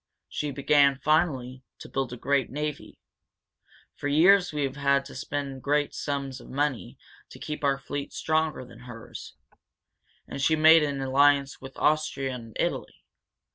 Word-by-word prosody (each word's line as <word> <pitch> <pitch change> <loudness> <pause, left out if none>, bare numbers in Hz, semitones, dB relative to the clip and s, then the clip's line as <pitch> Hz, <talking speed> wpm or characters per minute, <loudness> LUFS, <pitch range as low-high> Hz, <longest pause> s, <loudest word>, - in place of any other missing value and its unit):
She 150 - -3
began, 140 0 +3
finally, 135 -4 0 0.2
to - - -11
build 135 -2 -3
a 125 - -6
great 140 +1 0
navy. 150 +1 -5 1.0
For 145 - -5
years 180 +5 +5
we 150 -1 -2
have 135 0 -3
had 140 -1 +1
to - - -11
spend 140 -2 -5
great 145 +1 0
sums 140 -3 -4
of - - -14
money 140 -1 -2 0.3
to - - -12
keep 150 0 -6
our 140 -1 +2
fleet 140 +1 -6
stronger 155 -4 -1
than 115 -2 -15
hers. 120 -2 -10 0.9
And 140 - -6
she 160 +3 +3
made 160 +1 +7
an 140 -2 -1
alliance 140 +1 +2
with 135 0 -11
Austria 150 -3 0
and 115 -3 -9
Italy. - - -3
140 Hz, 155 wpm, -26 LUFS, 135-150 Hz, 1.0 s, made